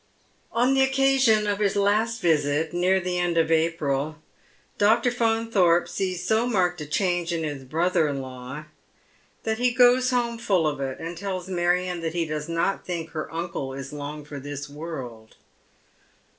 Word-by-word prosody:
On 245 +3 +2
the 270 - +3
occasion 265 -5 +3
of 205 0 -1
his 205 -2 +1
last 215 +3 +1
visit, 155 -1 +1
near 180 +2 +2
the 180 0 -2
end 175 -1 0
of 165 0 +2
April, 155 -3 0 0.6
Dr. 225 +4 +4
Faunthorpe 225 -7 +2
sees 185 -2 -3
so 225 +2 +2
marked 180 -7 +1
a 150 - -6
change 175 +1 0
in 165 -1 -1
his 145 -3 -4
brother 165 +4 +1
in 140 -1 -2
law 130 +3 -8 0.8
that 220 0 -1
he 250 0 +3
goes 250 +1 +5
home 240 -2 0
full 195 -8 +1
of 145 -2 -1
it, 135 -1 -3
and 165 +2 -5
tells 185 0 -4
Marion 180 0 0
tliat 165 -1 -3
he 170 -1 0
does 155 0 -4
not 170 +4 0
tliink 170 -3 -5
her 155 -1 -5
uncle 165 -5 -4
is 135 +1 -7
long 145 0 -6
for 145 -1 -7
this 145 +1 -6
world. 135 -7 -8
175 Hz, 170 wpm, -25 LUFS, 150-210 Hz, 0.8 s, goes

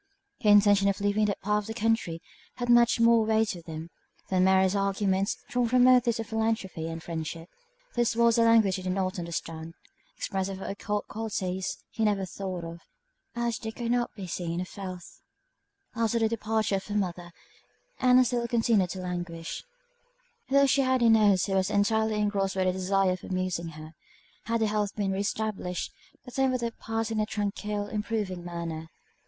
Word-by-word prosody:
Her 210 - +3
intention 205 -1 +6
of 200 - -1
leaving 205 +1 +2
that 200 -1 -2
part 210 +1 +1
of 205 - -11
the 225 - -5
country, 225 -7 0 0.3
had 245 -1 -4
much 240 0 +5
more 230 -1 +5
weight 220 0 +2
with 175 -2 -11
him, 160 +1 -7 0.4
than 185 -1 +3
Mary's 190 0 +4
arguments, 195 0 0
drawn 245 -1 0
from 250 +1 +4
motives 250 -2 +5
of 225 - -2
philanthropy 220 -7 -2
and 165 0 -6
friendship; 165 0 -5 0.5
this 240 -1 +1
was 235 0 +4
a - - +5
language 225 -4 +4
he - - -6
did 185 0 -2
not 190 0 -1
understand; 165 -1 -5 0.4
expressive 190 -1 -3
of - - -6
occult 205 +1 -3
qualities 190 -4 -3
he 225 - -2
never 205 -3 +1
thought 185 -1 -5
of, 165 0 -7 0.6
as 235 -1 -1
they 220 - -5
could 235 +1 -3
not 245 0 +1
be 195 - -6
seen 170 -1 -3
or 180 - -2
felt. 185 -2 -7 0.9
After 230 0 +1
the 225 -1 +3
departure 220 -2 0
of 190 - -8
her 205 - -4
mother, 175 -3 -2 0.7
Ann 255 0 +5
still 240 -1 -1
continued 225 -5 +2
to 185 +2 -5
languish, 175 -2 -5 0.9
though 280 +1 +5
she 275 +1 +3
had 260 -2 +2
a 230 - +6
nurse 205 -4 +5
who 195 - -2
was 190 0 +2
entirely 220 +1 +2
engrossed 205 -2 0
by 190 - +1
the 185 - +2
desire 190 0 +1
of 185 - -4
amusing 185 -2 -2
her. 155 +1 -10 0.5
Had 230 0 0
her 220 - +3
health 210 -1 -1
been 200 -2 -1
re 190 - -2
established, 200 -3 -3 0.3
the 250 - -10
time 265 +1 +1
would 255 - -1
have 235 -1 -4
passed 225 0 -2
in 220 - -1
a 215 - +2
tranquil, 210 0 -2
improving 210 -4 -3
manner. 165 -2 -5
205 Hz, 185 wpm, -28 LUFS, 185-225 Hz, 0.9 s, intention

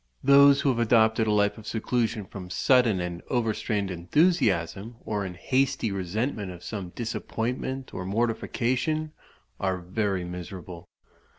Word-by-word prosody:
Those 140 0 +7
who 140 - +2
have 120 -3 +1
adopted 110 -1 +3
a - - +2
life 105 +1 +2
of 110 - -12
seclusion 115 -2 -1
from 95 -2 -9
sudden 115 0 +3
and 90 -1 -4
overstrained 110 -4 -1
enthusiasm, 100 - +1
or 105 -2 -2
in 90 -2 -6
hasty 130 +1 0
resentment 100 +2 -2
of 90 -1 -11
some 100 -5 -5
disappointment 125 +3 -3
or 90 - -4
mortification, 125 +8 -1 0.5
are 95 -1 0
very 95 +1 -2
miserable. 90 0 -8
110 Hz, 130 wpm, -27 LUFS, 95-125 Hz, 0.5 s, Those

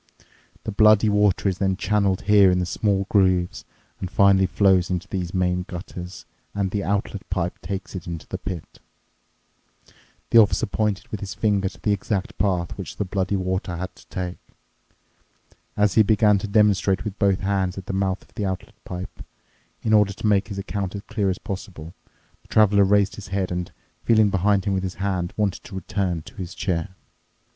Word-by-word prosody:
The 110 - -3
bloody 110 +1 +5
water 105 -1 +2
is 95 -2 -1
then 95 -1 +1
channeled 100 -1 +1
here 100 -2 +6
in 90 0 +1
small 100 +1 0
grooves 95 -4 +2 0.3
and 95 - -4
finally 95 +1 +4
flows 95 -2 +3
into 90 +1 -2
these 90 -4 -3
main 90 -1 0
gutters, 90 -1 -8 0.3
and 100 -2 -1
the 100 -1 -1
outlet 100 0 -1
pipe 90 -2 -2
takes 100 -1 -5
it 95 - -4
to 85 -2 -6
the - - -5
pit." 90 -4 -7 1.5
The 115 - +8
officer 105 -3 +4
pointed 105 -3 -1
with 105 - -4
his 100 +3 -6
finger 100 -3 +1
to - - -17
the 105 - 0
exact 100 +2 -2
path 90 -3 0
which - - -7
the 105 - -1
bloody 95 +1 -1
water 95 -1 -2
had 95 +2 -6
to - - -19
take. 90 -1 -5 1.4
As 105 -1 +3
he 110 - +6
began 105 -1 +4
to 105 - -4
demonstrate 100 -2 +3
with 105 -2 -6
both 100 -2 +2
hands 95 -2 0
at 95 - -6
the - - -4
mouth 95 0 -1
of - - -26
the 105 - -4
outlet 95 -2 -5
pipe, 90 0 -7 0.6
in 110 - +1
order 105 -2 +4
to 105 - -7
make 105 -1 +3
his 100 -3 -6
account 100 -1 -3
as 100 - -6
clear 105 -5 -1
as 95 - -1
possible, 90 -5 -7 0.5
the - - -25
Traveler 105 -2 +4
raised 100 0 +2
his 105 - -8
head 95 -1 -2
and, 90 0 -3 0.3
feeling 110 -3 +4
behind 100 +1 +2
him 100 - +1
with 95 - 0
his 95 -1 -4
hand, 95 -3 -2
wanted 105 -3 -1
to 115 -6 -10
return 95 -3 -2
to - - -14
his 90 -1 -6
chair. 90 0 -2
95 Hz, 185 wpm, -23 LUFS, 95-105 Hz, 1.5 s, The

